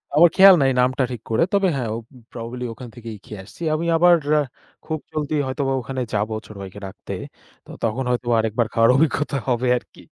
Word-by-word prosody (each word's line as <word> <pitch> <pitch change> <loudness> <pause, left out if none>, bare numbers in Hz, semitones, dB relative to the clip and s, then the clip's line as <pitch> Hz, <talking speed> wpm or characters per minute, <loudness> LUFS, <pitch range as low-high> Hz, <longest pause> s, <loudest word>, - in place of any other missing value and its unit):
আমার 170 +3 +7
খেয়াল 195 0 +9
নাই 135 -1 +3
নামটা 130 +2 +1
ঠিক 120 -3 -6
করে। 115 +8 +2
তবে 200 -1 +3
হ্যাঁ, 125 -4 -2
ও - - -3 0.3
প্রবাবলি 120 +1 -6
ওখান 125 +1 -10
থেকেই 115 -3 -8
খেয়ে 105 -3 -8
আসছি। 100 - -16
আমি 155 +2 -1
আবার 175 +1 +6
অ্যা 155 0 +4 0.5
খুব 155 -1 -3
জলদি 155 0 -2
হয়তোবা 135 0 -1
ওখানে 130 +2 -4
যাবো 105 +1 -1
ছোট 110 - -12
ভাইকে 95 +1 -9
রাখতে। 95 - -9 0.5
তো - - -20
তখন 120 +4 0
হয়তোবা 120 -1 0
আরেকবার 110 +1 0
খাওয়ার 115 0 +4
অভিজ্ঞতা 145 0 +1
হবে 125 +1 +1
আরকি। - - -12
125 Hz, 195 wpm, -22 LUFS, 115-150 Hz, 0.5 s, খেয়াল